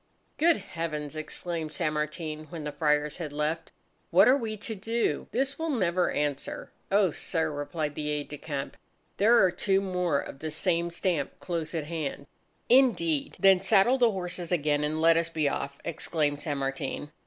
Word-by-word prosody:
"Good 330 Hz, +2 st, +5 dB
heavens!" 160 Hz, -6 st, -5 dB
exclaimed 160 Hz, 0 st, -4 dB
San 155 Hz, 0 st, -1 dB
Martin, 155 Hz, 0 st, -3 dB
when 155 Hz, +1 st, -7 dB
the 150 Hz, -, -3 dB
Friars 150 Hz, -1 st, +1 dB
had 165 Hz, -4 st, -5 dB
left. 150 Hz, +3 st, -2 dB, 0.4 s
"What -, -, +6 dB
are 255 Hz, -, +7 dB
we 225 Hz, -5 st, -3 dB
to 220 Hz, +2 st, -4 dB
do? 225 Hz, +3 st, -1 dB
This 270 Hz, +4 st, -1 dB
will 325 Hz, 0 st, -1 dB
never 185 Hz, -, +1 dB
answer!" 145 Hz, -2 st, -3 dB, 0.2 s
"O 195 Hz, -3 st, +4 dB
sir," 160 Hz, 0 st, -1 dB
replied 150 Hz, +1 st, -3 dB
the 150 Hz, 0 st, -3 dB
aide 150 Hz, -1 st, -2 dB
de 150 Hz, -, -8 dB
camp, 140 Hz, -3 st, -5 dB, 0.4 s
"there 225 Hz, +4 st, +5 dB
are 185 Hz, -, +4 dB
two 195 Hz, +2 st, +1 dB
more 180 Hz, -6 st, 0 dB
of 135 Hz, -, -7 dB
the 155 Hz, -, -4 dB
same 170 Hz, +2 st, 0 dB
stamp 170 Hz, -4 st, -1 dB
close 165 Hz, -2 st, -3 dB
at 160 Hz, -, -1 dB
hand." 155 Hz, -4 st, -4 dB, 0.4 s
"Indeed! 275 Hz, +4 st, +3 dB
Then 195 Hz, -2 st, +6 dB
saddle 200 Hz, +6 st, +4 dB
the 240 Hz, -2 st, +5 dB
horses 180 Hz, -3 st, -3 dB
again, 150 Hz, -3 st, +1 dB
and 155 Hz, +1 st, -1 dB
let 165 Hz, +1 st, +5 dB
us 165 Hz, 0 st, +1 dB
be 155 Hz, -3 st, 0 dB
off!" 140 Hz, 0 st, -3 dB
exclaimed 150 Hz, -3 st, -1 dB
San 145 Hz, -1 st, -2 dB
Martin. 135 Hz, +2 st, -3 dB
165 Hz, 175 wpm, -28 LUFS, 150-195 Hz, 0.4 s, are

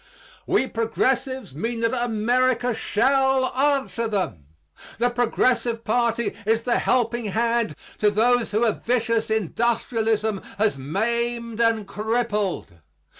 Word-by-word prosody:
We -, -, +2 dB
progressives 250 Hz, -, -1 dB
mean 230 Hz, -, -3 dB
that 230 Hz, +2 st, +1 dB
America 245 Hz, +1 st, +1 dB
shall 265 Hz, +4 st, +1 dB
answer 270 Hz, -3 st, +1 dB
them. 185 Hz, -, -3 dB, 0.5 s
The 245 Hz, +3 st, +1 dB
Progressive 240 Hz, -1 st, +1 dB
party 235 Hz, 0 st, 0 dB
is 225 Hz, +2 st, +1 dB
the 240 Hz, -1 st, +1 dB
helping 240 Hz, -1 st, +1 dB
hand 230 Hz, -3 st, 0 dB, 0.2 s
to 210 Hz, -, +4 dB
those 235 Hz, +3 st, +2 dB
whom 215 Hz, +3 st, +1 dB
a 230 Hz, -, +4 dB
vicious 230 Hz, -1 st, -1 dB
industrialism 220 Hz, 0 st, 0 dB, 0.2 s
has 210 Hz, -3 st, +2 dB
maimed 235 Hz, -, -2 dB
and 225 Hz, -3 st, +2 dB
crippled. 210 Hz, -, -2 dB
230 Hz, 115 wpm, -23 LUFS, 220-245 Hz, 0.5 s, to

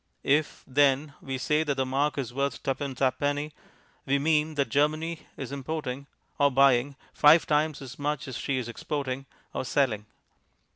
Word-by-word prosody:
If, 150 Hz, +2 st, +1 dB
then, 140 Hz, +1 st, +2 dB
we 135 Hz, -1 st, -4 dB
say 150 Hz, +4 st, +1 dB
that 145 Hz, -3 st, -1 dB
the 135 Hz, -1 st, 0 dB
mark 140 Hz, +3 st, 0 dB
is 125 Hz, -4 st, -3 dB
worth 140 Hz, +1 st, -2 dB
tuppence 135 Hz, -1 st, -2 dB
ha'penny, 145 Hz, +3 st, 0 dB, 0.6 s
we 140 Hz, +1 st, +3 dB
mean 155 Hz, +1 st, +1 dB
that 140 Hz, -2 st, 0 dB
Germany 155 Hz, +3 st, 0 dB
is 135 Hz, -1 st, -6 dB
importing 140 Hz, -1 st, -4 dB, 0.3 s
(or 145 Hz, 0 st, +5 dB
buying) 135 Hz, 0 st, +4 dB, 0.2 s
five 155 Hz, +3 st, +6 dB
times 150 Hz, -1 st, +1 dB
as 135 Hz, +1 st, -10 dB
much 145 Hz, -1 st, -2 dB
as 130 Hz, -, -6 dB
she 135 Hz, +1 st, -1 dB
is 125 Hz, -3 st, -3 dB
exporting 135 Hz, +2 st, -4 dB, 0.3 s
(or -, -, -2 dB
selling). 120 Hz, -6 st, 0 dB
140 Hz, 160 wpm, -27 LUFS, 130-150 Hz, 0.6 s, five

